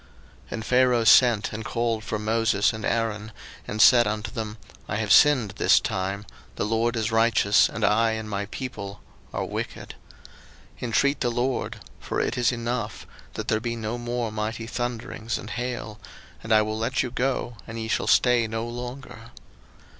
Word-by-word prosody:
02:009:027 - - -9
And 110 - -5
Pharaoh 125 -1 +3
sent, 115 -1 +5
and 110 +1 -5
called 115 -2 -1
for 110 - -3
Moses 110 -1 +1
and 110 -1 -7
Aaron, 110 -2 -1 0.4
and 105 - -4
said 120 0 +7
unto 110 +1 -3
them, 110 -1 -5 0.3
I - - -1
have 105 -1 -1
sinned 130 -9 +5
this - - +5
time: 95 +2 -3 0.3
the - - -1
LORD 115 +2 0
is 110 0 -1
righteous, 110 -2 +4
and 110 0 -1
I 110 +1 +3
and 110 -1 -4
my 100 -1 -3
people 105 -5 -6 0.3
are - - -2
wicked. - - -5 0.9
02:009:028 125 - -3
Intreat 140 +5 +2
the 120 - +1
LORD 120 +1 -1 0.2
(for - - -3
it - - 0
is 125 -1 +2
enough) 120 -2 -3 0.3
that - - -5
there 110 - +1
be 115 +1 -3
no 115 +1 -4
more 120 -1 -3
mighty 110 +1 -3
thunderings 115 -1 -4
and - - -8
hail; 120 -3 -4 0.4
and 115 - -7
I 110 -1 +6
will 110 +1 -3
let 120 +3 0
you 125 - -4
go, 125 -2 -2
and 115 0 -7
ye 110 -1 -4
shall - - -1
stay 120 -2 +4
no 115 +1 -3
longer. 120 -1 -8
115 Hz, 175 wpm, -25 LUFS, 110-120 Hz, 0.9 s, said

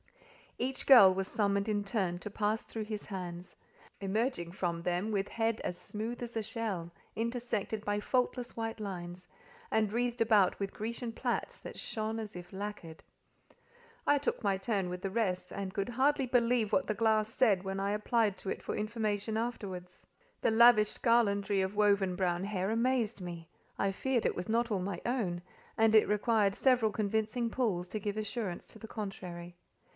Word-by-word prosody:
Each 260 +2 -2
girl 220 -9 +9
was 190 0 -2
summoned 200 0 +1
in 205 -1 +1
turn 195 -4 -1
to 210 - -6
pass 210 +2 0
through 225 - -5
his 210 -1 -5
hands; 180 -3 -6 0.4
emerging 200 -2 -1
from 170 -2 -2
them 180 +5 -1
with 200 -1 0
head 225 -1 -1
as 175 - -3
smooth 220 +6 -5
as 235 -1 -7
a 225 - 0
shell, 210 -6 -3 0.2
intersected 230 -2 -2
by 205 0 0
faultless 250 +2 -1
white 225 -1 -3
lines, 180 -3 -6 0.4
and 215 -2 +1
wreathed 245 +1 0
about 215 -5 +4
with 200 -1 -3
Grecian 230 +2 -4
plaits - - -2
that - - -9
shone 220 0 -3
as 215 -2 -6
if 175 0 -9
lacquered. 195 -5 -6 1.0
I 290 - +5
took 285 -3 -2
my 200 -2 +2
turn 195 -2 -1
with 180 0 -5
the 195 - -2
rest, 190 -4 -1
and 195 -1 -4
could 200 +2 -2
hardly 270 +3 +2
believe 240 -3 +2
what - - +3
the 215 - 0
glass 220 -1 +2
said 220 -6 +3
when 195 0 -3
I 200 +1 0
applied 210 -1 +1
to 195 - -5
it - - -3
for - - -3
information 215 0 -1
afterwards; 200 -6 -5 0.4
the - - +3
lavished 220 -2 +6
garlandry 205 -4 +3
of 190 +2 -3
woven 200 -3 +3
brown 180 -1 0
hair 195 0 -1
amazed 235 -2 +1
me—I 175 +2 -5
feared 245 +4 0
it - - +1
was 180 +4 -5
not 230 +1 +1
all 200 - +1
my 185 -1 -3
own, 210 -9 -1 0.4
and 220 0 +4
it 215 - +6
required 210 -1 +2
several 250 -5 +3
convincing 220 +3 -1
pulls 200 -9 0
to 215 - -3
give 205 +1 -3
assurance 215 -4 -3
to 220 - -13
the 220 - -8
contrary. 180 -5 -6
210 Hz, 175 wpm, -32 LUFS, 190-230 Hz, 1.0 s, girl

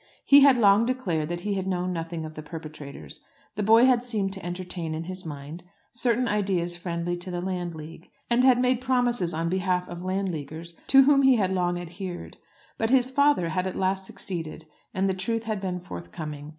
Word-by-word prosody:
He 280 - +8
had 275 -2 +7
long 210 0 +5
declared 175 -12 -1
that 175 0 -3
he 200 0 -1
knew 180 -1 -2
nothing 165 -2 -4
of 155 - -8
the 155 - -7
perpetrators. 150 - -9 0.3
The 210 - -3
boy 225 +4 +6
had 250 -2 +3
seemed 210 -6 -1
to 195 - -5
entertain 175 -2 -4
in 160 - -4
his 185 0 -7
mind 150 +3 -8 0.3
certain 245 0 0
ideas 190 -5 0
friendly 175 0 -3
to 175 +2 -8
the 175 -1 -3
Landleague, 170 -3 -6 0.2
and 240 +1 +3
had 255 -2 +6
made 250 0 +2
promises 245 -8 +1
on 165 +1 -2
behalf 180 0 0
of 175 0 -7
Landleaguers 170 -4 -4
to 270 0 +7
which 275 -1 +5
he 265 - +6
had 190 -4 +1
long 175 -1 0
adhered. 175 +1 -7 0.4
But 225 - +1
his 255 0 +3
father 280 -10 +3
had 185 +2 -1
at 185 - -5
last 190 0 0
succeeded, 165 -4 -5 0.3
and 190 +1 0
the 190 - +1
truth 225 +5 -2
had 215 -3 -3
been 180 -2 -3
forthcoming. 145 - -8
185 Hz, 190 wpm, -26 LUFS, 170-225 Hz, 0.4 s, He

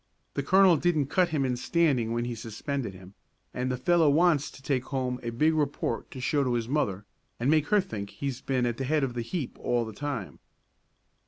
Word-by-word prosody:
The - - -1
colonel 190 -3 +5
didn't 155 -4 +1
cut 180 -2 +3
him 150 -4 0
in 125 -1 0
standing 130 -4 +1
when 120 +1 -1
he 120 - -3
suspended 115 0 -4
him, 95 +1 -13 0.4
and 125 +1 -1
the 125 - -1
fellow 165 +4 +3
wants 155 -1 +3
to 135 - -15
take 135 -3 0
home 130 -2 -2
a 120 - -3
big 155 +8 +2
report 145 -6 -1
to 130 - -9
show 140 +3 +1
to 125 -2 0
his 115 -1 -1
mother, 105 -8 -1 0.3
and 125 +5 +2
make 155 -1 +3
her 210 0 +4
think 105 - -4
he's 130 +3 -5
been 130 -2 0
at 120 -1 -1
the 135 - -2
head 150 +2 +1
of 130 -3 -1
the 120 - -3
heap 135 +3 -4
all 120 -1 0
the 110 - -7
time." 135 -4 -5
135 Hz, 220 wpm, -28 LUFS, 120-155 Hz, 0.4 s, colonel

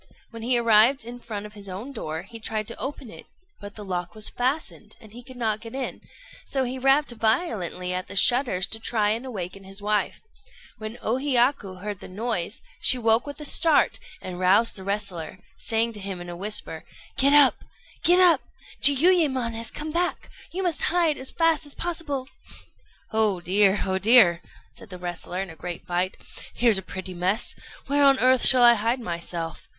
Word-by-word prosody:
When 230 -1 -9
he 245 +2 +2
arrived 230 +2 +4
in 240 +1 -8
front 210 -3 -7
of 210 - -11
his 200 -2 -8
own 205 +9 -7
door, 160 - -5
he 230 - -10
tried 215 -1 -3
to 235 - -8
open 270 -4 -6
it; - - -13 0.3
but 205 -1 -10
the 210 - -9
lock 180 0 -4
was 215 -1 -2
fastened, 265 +6 -3
and 215 -3 -16
he 245 - -10
could 255 +1 -13
not 220 -3 -1
get 230 +2 -10
in, 270 -1 -5 0.4
so 270 -1 -1
he 255 +1 -3
rapped 270 +2 +3
violently 220 - -1
at 185 +1 -4
the - - -9
shutters 240 -3 +2
to 220 - -4
try 215 -2 +1
and 235 +4 -3
awaken 195 -4 -6
his 195 +1 -5
wife. 210 -1 -1 0.6
When 215 +2 -7
O 230 +3 0
Hiyaku 245 -8 0
heard 205 -2 -5
the - - -10
noise, 205 0 -4 0.2
she 255 - +6
woke 230 +2 +2
with 285 - -8
a - - -5
start, 320 +2 +3 0.2
and 180 -1 -7
roused 195 +5 +3
the 190 - -6
wrestler, 195 -4 -4 0.2
saying 230 +1 -1
to 210 - -6
him 195 -2 -6
in 175 0 -8
a - - -7
whisper 205 +4 -3 0.4
"Get 280 +2 +5
up! 290 -2 +5 0.4
get 355 +1 +5
up! 360 -2 +6 0.4
Jiuyémon 285 -5 +4
has 225 0 -5
come 305 +1 -6
back. 350 +2 -2 0.2
You 380 +3 -4
must 350 -3 -1
hide 330 -3 +1
as 260 - -4
fast 330 -2 +1
as 285 - -4
possible." 315 -6 -4 0.8
"Oh 215 -4 +1
dear! 195 +3 +2
oh 190 0 -1
dear!" 195 -5 +5 0.3
said 230 - -14
the 180 - -8
wrestler, 180 +1 -5
in 185 - -9
a - - -12
great 175 +1 -7
fright; 180 +1 -2 0.4
"here's 230 -5 +3
a - - -7
pretty 190 0 -8
mess! 185 +6 -1 0.3
Where 285 +1 +1
on 275 -1 +6
earth 255 -1 +3
shall 255 -2 +6
I 240 0 +8
hide 230 +3 -1
myself?" 170 -4 -6
225 Hz, 195 wpm, -24 LUFS, 190-260 Hz, 0.8 s, I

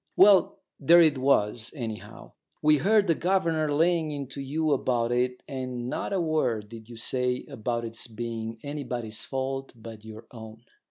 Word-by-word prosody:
"Well, 195 -2 +6 0.2
there 170 +5 +6
it 150 -4 +2
was, 120 -3 +2
anyhow. 115 -6 -7 0.3
We 150 0 +5
heard 205 +7 +3
the 170 - +3
governor 165 -4 +1
laying 165 +1 +2
into 140 -1 -6
you 155 +3 -1
about 120 -3 +1
it, 125 +1 0
and 130 -3 -4
not - - -3
a 195 - +1
word 130 -11 0
did 115 0 -11
you 120 - -9
say 125 +2 -1
about 120 +1 -3
it's 115 +1 -5
being 115 0 -5
anybody's 125 -7 -5
fault 135 0 -4
but 110 -1 -11
your 110 +1 -10
own. 110 -1 -11
130 Hz, 160 wpm, -27 LUFS, 115-155 Hz, 0.3 s, Well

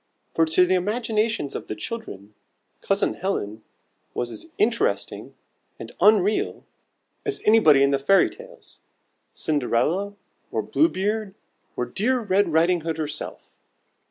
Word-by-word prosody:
For 165 - +3
to 160 +3 +4
the 185 - +1
imaginations 215 - 0
of - - -6
the 110 - -4
children, 105 - -7 0.5
Cousin 195 0 +1
Helen 110 - -3 0.5
was 120 -1 -2
as 325 - -9
interesting 240 - -1 0.4
and - - -9
unreal 210 -1 +3 0.6
as 420 - -3
anybody 160 -11 +6
in 140 - +3
the 140 - +1
Fairy 195 +8 +4
Tales: - - -15 0.5
Cinderella, 155 +8 0 0.4
or - - -1
Blue 320 - +2
Beard, 205 - -2 0.4
or 125 - -1
dear 220 - 0
Red 200 -4 +1
Riding 170 +2 +3
Hood 160 0 -3
herself. 150 -1 -6
190 Hz, 130 wpm, -24 LUFS, 150-220 Hz, 0.6 s, anybody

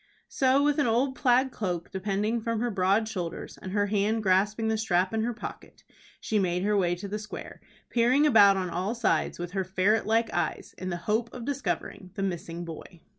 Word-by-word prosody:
So 270 +1 +3
with 295 0 +2
an 290 - +3
old 250 +4 +2
plaid 260 0 +3
cloak 180 -7 -3
depending 205 +4 -1
from 230 0 -1
her 240 +1 -1
broad 200 +3 +2
shoulders, 180 -6 -5
and 185 - -6
her 205 +1 +1
hand 210 +2 0
grasping 205 +4 +2
the 220 - +1
strap 190 -3 +1
in 220 - +1
her 235 +2 0
pocket, 235 - -9 0.4
she 215 - 0
made 180 -1 0
her 210 +1 +2
way 175 -3 +2
to 185 +3 -7
the 210 +2 -4
square, 215 - -9 0.3
peering 250 +5 +4
about 205 -8 +6
on 185 -2 -2
all 190 +7 -2
sides 230 -1 0
with 175 0 -5
her 190 0 -1
ferret 190 +4 +1
like 225 +1 +1
eyes 175 -3 -2
in 185 - -4
the 175 - -2
hope 225 +2 0
of 240 -2 -7
discovering 255 -8 -3
the 195 - -2
missing 175 -2 -4
boy. 165 +1 -10
210 Hz, 205 wpm, -28 LUFS, 185-230 Hz, 0.4 s, about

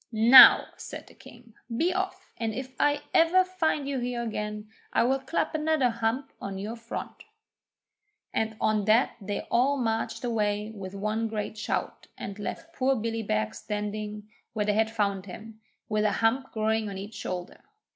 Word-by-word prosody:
'Now,' 235 +3 +9
said - - -8
the - - -17
King, 235 -1 -16 0.2
'be 350 +6 +2
off, 380 0 -4
and 225 -2 -3
if 260 0 -5
ever 310 +4 +3
I 370 - +7
find 325 -6 -1
you 275 -2 -1
here 245 -1 -2
again, 210 -1 -4 0.2
I - - +3
will 265 +3 +2
clap 270 +6 -2
another 310 -5 +2
hump 235 +4 -2
on 195 -1 -5
to - - -5
your 215 +4 -5
front!' 230 - -7 1.1
And 220 0 -1
on 215 -2 +1
that 220 +5 +4
they 205 +1 -3
all 270 +4 +3
marched 225 -2 -2
away 210 -2 -1
with 195 -2 -8
one 215 +3 -1
great 215 -1 -4
shout, 215 - -3
and 200 +1 -7
left 325 +10 -6
poor 270 -2 +1
Billy 225 -1 -2
Beg 110 - -1
standing 210 0 -5 0.3
where 210 -2 -1
they 210 - +2
had 220 +1 +2
found 200 -3 -1
him, 220 +4 -10 0.3
with 215 -1 0
a 210 - +2
hump 255 +4 +1
growing 220 -1 0
on 195 - -6
each 200 +3 -7
shoulder. 185 -4 -6
225 Hz, 175 wpm, -27 LUFS, 210-255 Hz, 1.1 s, Now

